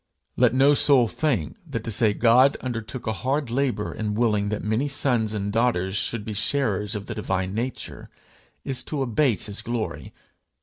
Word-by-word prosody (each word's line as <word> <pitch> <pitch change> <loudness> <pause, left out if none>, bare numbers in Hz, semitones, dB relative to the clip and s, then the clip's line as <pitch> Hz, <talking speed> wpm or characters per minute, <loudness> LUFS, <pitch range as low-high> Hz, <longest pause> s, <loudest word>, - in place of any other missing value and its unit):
Let - - +3
no 140 +2 +5
soul 135 -4 +5
think 115 - -1
that - - -5
to 115 - -3
say 110 +1 +3
God 125 +4 +5
undertook 120 0 -5
a 110 - -1
hard 130 +2 -2
labour 125 -4 -1
in 105 -1 -3
willing 105 -3 +1
that 105 - -3
many 110 +7 0
sons 125 -6 0
and 100 -1 -3
daughters 105 -5 +1
should 105 0 -1
be 110 - -4
sharers 105 -3 0
of 100 -1 -5
the - - -5
divine 95 -3 -2
nature, 120 +4 -4 0.6
is 135 -2 -2
to 145 -3 -2
abate 125 -1 +1
his 105 -1 -5
glory! 110 -10 -4
115 Hz, 175 wpm, -24 LUFS, 105-130 Hz, 0.6 s, no